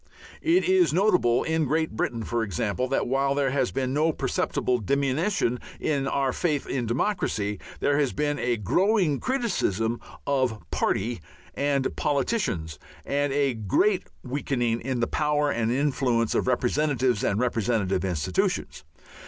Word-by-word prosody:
It 335 +3 +3
is 375 -1 +4
notable 180 - +3
in 160 -1 0
Great 160 +3 0
Britain, 115 +1 -2
for 120 +1 -1
example, 110 +4 -1
that 135 - 0
while 135 +2 +1
there 140 -2 +1
has 130 -2 +1
been 130 -1 -2
no 155 +3 +2
perceptible 125 -3 -1
diminution 140 - 0 0.2
in 140 -3 0
our 135 -2 0
faith 150 -5 -1
in 125 -3 -2
democracy, 110 - -1 0.2
there 145 0 +2
has 140 -4 +2
been 145 0 -1
a 120 -1 0
growing 175 - +2
criticism 120 - 0 0.3
of 130 -5 +1
"party" 110 -1 0 0.3
and 140 -2 0
"politicians," 135 - -1 0.3
and 145 0 0
a 140 -2 +2
great 150 - +1 0.2
weakening 125 -3 -1
in 125 -1 -2
the - - +3
power 150 0 +1
and 115 -2 0
influence 130 -4 +1
of - - 0
representatives 130 -2 +1
and 100 - +1
representative 110 -6 0
institutions. 90 -3 -1
135 Hz, 140 wpm, -26 LUFS, 115-150 Hz, 0.3 s, is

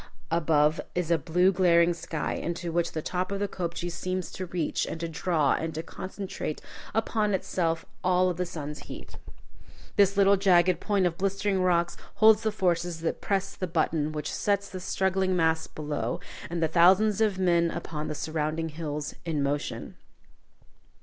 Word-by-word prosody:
Above 155 -2 +3
is 175 -2 -1
a 170 - +5
blue 180 +6 +3
glaring 175 -2 +4
sky, 165 -2 -3
into 170 0 -3
which 170 0 0
the 155 - -3
top 185 +1 -2
of 200 - -2
the 205 - 0
kopje 175 -2 -4
seems 185 +1 -3
to 185 - -5
reach, 170 -3 -1
and 165 - -5
to 170 - -2
draw 160 -3 +1
and 160 -1 -3
concentrate 190 -5 -5 0.4
upon 215 -2 +1
itself 165 -3 -1 0.2
all 185 0 +3
of 180 -2 -1
the 180 - 0
sun's 150 -3 -6
heat. - - -9 0.8
This 200 -1 +4
little 200 0 +5
jagged 185 -2 +4
point 200 -3 +1
of 170 -1 -1
blistering 195 0 0
rocks 175 -1 +2 0.2
holds 220 0 +6
the 220 - 0
forces 175 -3 0
that 165 - -2
press 195 -1 -1
the 185 - -3
button 155 -2 0
which 150 -1 -4
sets 200 -1 0
the 185 - -5
struggling 190 0 0
mass 160 -2 +2
below, 145 -6 -3 0.3
and 170 0 -1
the - - +4
thousands 190 +6 +4
of 210 -4 +2
men 170 -2 +3
upon 155 -3 -4
the - - -3
surrounding 155 +1 -2
hills, 150 -2 -4
in 160 -4 -1
motion. 145 +1 -3
175 Hz, 170 wpm, -28 LUFS, 160-190 Hz, 0.8 s, holds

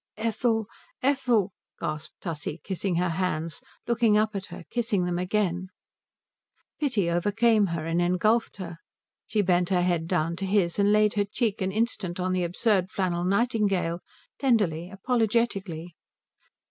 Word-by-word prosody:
"Ethel 225 0 0 0.4
Ethel 250 -7 +2
" - - -43
gasped 155 0 -4
Tussie, 160 -2 -4
kissing 190 -1 -2
her 180 +1 +1
hands, 165 -2 -2 0.2
looking 230 -3 +3
up 215 0 +1
at 195 0 -4
her, - - -9
kissing 230 -6 0
them 175 0 -1
again. 185 -1 0 1.1
Pity 245 - +1
overcame 205 +5 +3
her, 165 -2 -3
engulfed 180 +7 +1
her. 175 -4 -7 0.5
She 210 -1 +1
bent 180 -1 +2
her 180 -2 +2
head 175 -2 0
down 170 -1 0
to 195 - -3
his 190 -2 +1
and 200 0 +4
laid 210 0 +4
her 205 -1 +1
cheek 215 0 -1
an 190 0 0
instant 210 -4 -1
on 185 0 0
the 180 -1 +1
absurd 185 +1 +1
flannel 175 -3 -1
nightingale, 200 -4 +1 0.4
tenderly, 190 - +1
apologetically. 200 -5 -1
190 Hz, 145 wpm, -27 LUFS, 175-220 Hz, 1.1 s, and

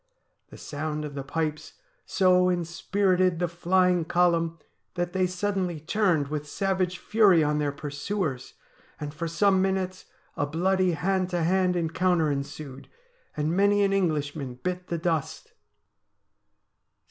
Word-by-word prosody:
The - - -12
sound 150 +1 -4
of 145 - -7
the 140 - -4
pipes 155 +2 -3 0.3
so 185 -1 +4
in 175 -2 0
spirited 185 +1 +1
the 175 +1 0
flying 180 +1 +2
column 165 -1 +1 0.4
that 175 0 -2
they 185 -1 +2
suddenly 185 -2 -2
turned 165 -3 +1
with 150 -1 -4
savage 185 0 -1
fury 200 -7 +4
on 150 0 +1
their 145 -1 0
pursuers, 145 0 -4 0.4
and 145 -1 -5
for 165 +2 -4
some 190 +3 +3
minutes 190 -1 -1 0.3
a 145 - -1
bloody 185 +3 +1
hand 185 +3 0
to 175 -2 -1
hand 180 +1 +2
encounter 170 -1 +1
ensued, 140 -1 -6 0.5
and 155 +3 0
many 200 +1 +3
an 195 0 +2
Englishman 150 -8 -1
bit 180 0 -3
the 170 - -2
dust. 165 -3 -3
175 Hz, 135 wpm, -26 LUFS, 155-185 Hz, 0.5 s, so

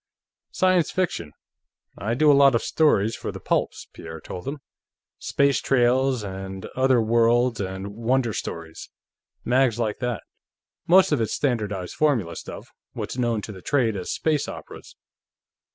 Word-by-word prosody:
"Science 185 -2 +2
fiction. 130 - -2 0.6
I 110 +5 -2
do 150 +3 +5
a - - +6
lot 140 -2 +6
of 115 - +1
stories 115 -9 +2
for - - -5
the - - -8
pulps," - - -1
Pierre 80 -1 -9
told 90 +3 -8
him. 140 +2 -3 0.6
"Space 140 -1 +1
Trails, 130 -1 +2
and 95 -1 -6
Other 130 -1 +3
Worlds, 115 +1 +2
and 95 +1 -5
Wonder 120 0 0
Stories; 80 -3 -6 0.6
mags 125 -2 +2
like 110 -3 -2
that. 125 -3 -3 0.6
Most 185 +1 +6
of 145 -6 +2
it's 110 - -1
standardized 105 -9 -2
formula 115 - +1
stuff; - - -8 0.3
what's 125 - -5
known 115 -4 0
to - - -6
the 95 -3 -11
trade 120 -2 +1
as 90 -2 -4
space 155 -3 0
operas. - - -10
120 Hz, 150 wpm, -24 LUFS, 100-135 Hz, 0.6 s, a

